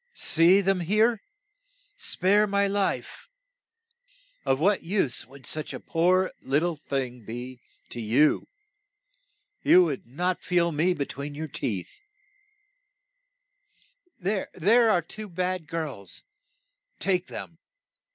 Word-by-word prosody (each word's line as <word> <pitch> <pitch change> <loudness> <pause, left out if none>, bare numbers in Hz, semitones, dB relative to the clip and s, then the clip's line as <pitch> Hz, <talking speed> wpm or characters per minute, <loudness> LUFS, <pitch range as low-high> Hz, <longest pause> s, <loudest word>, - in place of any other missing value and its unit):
See, 175 +4 +4
them 195 -1 +1
there! 215 +5 +2 0.7
Spare 205 +4 +2
my 200 0 +2
life! 200 0 -2 1.2
Of 135 - +2
what 195 +5 +3
use 165 - -1
would 135 0 -14
such 155 -1 -3
a - - -6
poor 185 +3 +2
lit 140 +3 +1
tle 175 -1 0
thing 130 -5 -4
be 120 +3 -7 0.3
to 120 - -6
you? 120 +8 +3 1.1
You 180 - +7
would 150 -8 -3
not 180 +8 -2
feel 170 -1 +1
me 170 +4 +1
be 140 - -2
tween 140 +2 -7
your 155 +2 -4
teeth. 110 - -4 2.2
There 195 +1 -2 0.4
are 175 -5 +3
two 215 +5 -9
bad 180 -1 -2
girls; 150 -11 -5 0.8
take 185 -2 0
them. 165 - -8
170 Hz, 115 wpm, -26 LUFS, 140-185 Hz, 2.2 s, You